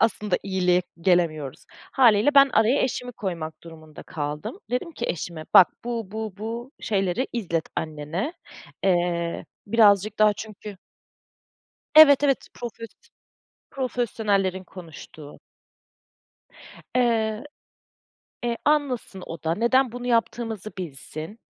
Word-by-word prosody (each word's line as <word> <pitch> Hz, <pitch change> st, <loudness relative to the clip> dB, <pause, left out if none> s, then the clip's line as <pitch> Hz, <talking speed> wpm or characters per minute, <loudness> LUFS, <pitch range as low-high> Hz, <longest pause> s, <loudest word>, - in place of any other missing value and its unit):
aslında 210 Hz, -3 st, +1 dB
iyiliğe 180 Hz, -2 st, +1 dB, 0.2 s
gelemiyoruz. 165 Hz, -6 st, 0 dB, 0.3 s
Hâliyle 245 Hz, +1 st, +4 dB
ben 275 Hz, 0 st, +8 dB
araya 225 Hz, +6 st, +3 dB
eşimi 250 Hz, -1 st, -3 dB
koymak 170 Hz, -7 st, -5 dB
durumunda 155 Hz, -2 st, -12 dB
kaldım. 150 Hz, -, -5 dB
Dedim 250 Hz, +7 st, -2 dB
ki 240 Hz, -, -4 dB
eşime, 165 Hz, -1 st, -4 dB
bak 180 Hz, -, +9 dB, 0.2 s
bu, 230 Hz, -5 st, -4 dB
bu, 220 Hz, -1 st, -5 dB
bu 235 Hz, +5 st, -6 dB
şeyleri 195 Hz, +4 st, 0 dB
izlet 170 Hz, -9 st, -2 dB
annene, 160 Hz, -, -3 dB, 0.5 s
eee, 175 Hz, -2 st, 0 dB, 0.2 s
birazcık 210 Hz, -1 st, +4 dB
daha 215 Hz, -1 st, +5 dB
çünkü 210 Hz, -1 st, -9 dB, 1.2 s
Evet, 290 Hz, -2 st, +9 dB
evet 275 Hz, -2 st, +1 dB
profes 230 Hz, -1 st, -7 dB, 0.8 s
profesyonellerin 210 Hz, -7 st, -1 dB
konuştuğu, 160 Hz, -4 st, -12 dB, 1.6 s
eee, 225 Hz, -2 st, +1 dB, 1.0 s
e, 235 Hz, -1 st, 0 dB
anlasın 270 Hz, -10 st, 0 dB
o 165 Hz, -1 st, -8 dB
da 165 Hz, +1 st, 0 dB
neden 240 Hz, +3 st, +2 dB
bunu 245 Hz, 0 st, -6 dB
yaptığımızı 230 Hz, -3 st, -1 dB
bilsin, 160 Hz, +4 st, -6 dB
210 Hz, 105 wpm, -24 LUFS, 175-240 Hz, 1.6 s, bak